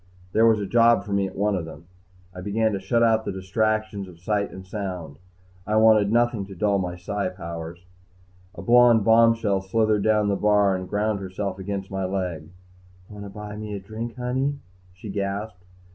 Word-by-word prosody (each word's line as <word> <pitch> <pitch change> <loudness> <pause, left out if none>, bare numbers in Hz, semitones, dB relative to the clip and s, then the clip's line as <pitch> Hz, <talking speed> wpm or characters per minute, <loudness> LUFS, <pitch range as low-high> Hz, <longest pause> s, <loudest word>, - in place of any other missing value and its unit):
There 110 +3 +4
was 110 -1 +4
a 100 - -2
job 115 +3 +4
for 100 - -5
me 100 -1 +1
at - - -11
one 105 +1 +1
of 90 -3 -3
them. 80 0 -11 0.5
I 90 - -8
began 110 +3 0
to 100 - -2
shut 115 +5 +1
out 110 -1 +3
the - - -3
distractions 105 +1 -1
of 85 -2 -14
sight 100 +3 -1
and 95 0 -10
sound. 90 -7 -6 0.5
I 105 - 0
wanted 110 -2 +5
nothing 120 -4 +1
to 95 - -10
dull 100 +2 +1
my 90 -2 -3
PSI 95 +2 -3
powers. 85 -1 -8 0.7
A 85 - -8
blond 120 0 +5
bombshell 115 -3 +4
slithered 110 +2 +1
down 105 -1 +2
the 100 - +1
bar 105 -1 +3
and 95 0 -6
ground 105 +1 0
herself 95 0 -4
against 95 0 -5
my 95 -1 -2
leg. 90 -5 -3 0.6
"Wanna 100 -1 -9
buy 105 +1 -8
me 105 -1 -6
a - - -4
drink, 110 +4 -7
honey?" 130 +3 -1 0.4
she 90 +3 -12
gasped. 100 -1 -4
100 Hz, 190 wpm, -24 LUFS, 95-110 Hz, 0.7 s, wanted